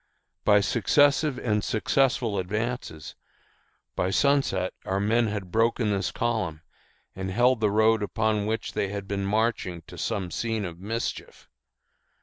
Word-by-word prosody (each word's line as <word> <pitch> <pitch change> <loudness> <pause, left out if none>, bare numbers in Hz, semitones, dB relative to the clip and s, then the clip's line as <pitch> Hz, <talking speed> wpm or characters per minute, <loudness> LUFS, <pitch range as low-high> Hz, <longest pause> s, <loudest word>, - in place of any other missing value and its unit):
By 105 -1 +5
successive 140 +7 +3
and 105 -3 0
successful 120 -2 +1
advances, 105 - -4 0.8
by 90 - 0
sunset 100 -6 +1
our 95 +1 -1
men 115 +3 +2
had 100 -4 -4
broken 115 0 +2
this 100 -1 0
column 100 -10 -2 0.5
and 95 0 -4
held 120 +5 +3
the 105 -1 +2
road 110 +1 +3
upon 105 0 0
which 110 +1 -3
they 100 - 0
had 100 0 -5
been 100 -1 -2
marching 105 -5 -1
to - - -12
some 95 -3 -2
scene 115 -1 -2
of 85 -1 -7
mischief. 115 +5 -5
105 Hz, 135 wpm, -26 LUFS, 95-115 Hz, 0.8 s, By